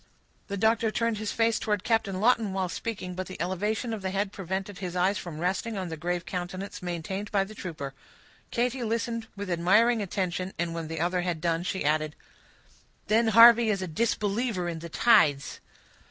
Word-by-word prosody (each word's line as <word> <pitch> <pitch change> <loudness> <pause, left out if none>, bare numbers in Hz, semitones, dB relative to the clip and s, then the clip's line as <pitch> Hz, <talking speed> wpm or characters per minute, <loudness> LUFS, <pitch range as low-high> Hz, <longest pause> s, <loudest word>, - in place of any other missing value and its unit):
The 200 - -4
doctor 220 +2 +2
turned 230 -1 -1
his 215 -1 -2
face 225 -1 +2
towards 210 -3 -1
Captain 220 -5 0
Lawton 225 -2 +3
while 190 -1 -1
speaking, 185 -2 -4
but 185 +1 -4
the 185 - -9
elevation 210 +6 -1
of 215 - -4
the 190 - -2
head 195 +1 -1
prevented 190 0 -4
his 180 -2 -5
eyes 185 +3 +2
from 170 -4 -7
resting 195 +5 -1
on 185 -2 -3
the 160 - -4
grave 175 +2 -2
countenance 185 +2 -5
maintained 180 +3 -4
by 200 -2 +3
the 200 +2 -9
trooper. 155 -9 -6 0.6
Katy 245 +1 -1
listened 230 0 -2
with 200 -2 -5
admiring 210 +7 +4
attention, 185 -1 -2
and 170 0 -2
when 165 -1 -4
the 165 0 -5
other 180 +2 +1
had 175 -2 -2
done, 165 0 0
she 185 -1 -3
added,— 155 0 +1 0.9
"Then 225 +2 +4
Harvey 230 +1 +8
is 195 -3 0
a - - -3
disbeliever 210 +1 -1
in 165 -1 -4
the 170 +1 -8
tides." 145 -10 +3
190 Hz, 185 wpm, -28 LUFS, 175-220 Hz, 0.9 s, Harvey